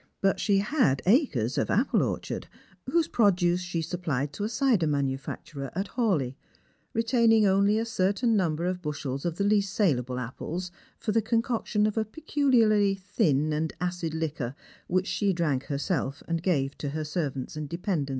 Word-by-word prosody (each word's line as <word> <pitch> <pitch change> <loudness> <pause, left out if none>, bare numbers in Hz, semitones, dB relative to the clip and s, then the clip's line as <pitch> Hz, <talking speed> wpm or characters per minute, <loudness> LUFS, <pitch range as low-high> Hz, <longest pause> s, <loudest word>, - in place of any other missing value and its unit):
But 195 0 +2
she 200 -2 +2
had 205 - +2
acres 180 - +2
of - - -1
apple 230 +9 +2
orchard, - - -3 0.4
whose 335 -2 +2
produce 180 -5 +3
she 175 -2 -3
supplied 155 -5 -2
to 205 - -4
a 210 - -1
cider 230 - +2
manufacturer 140 0 -3
at 195 +2 -2
Hawleigh, 180 - 0 0.6
retaining 225 -1 +3
only 200 +2 +3
a 225 - 0
certain 225 +2 +1
number 170 -4 0
of 180 0 -2
bushels 145 -3 -4
of 170 -2 -1
the 200 - -1
least 200 -1 +2
saleable 130 - +1
apples 165 +9 -5 0.3
for 215 - -2
the 225 +1 +3
concoction 225 -1 0
of 215 +1 -1
a 220 - 0
peculiarly 225 -6 +2
thin 165 - +1
and 155 +1 -1
acid 175 -2 -2
liquor 150 -6 -3 0.3
whicn 185 +1 +1
she 200 -1 0
drank 150 -6 0
hersel^ 140 -1 -2
and 165 -1 -1
(rave 140 -6 +1
to 145 - -3
her 155 +2 -3
servants 150 -4 -3
and 150 -2 -5
dependents. 170 -4 -2
180 Hz, 165 wpm, -27 LUFS, 150-210 Hz, 0.6 s, produce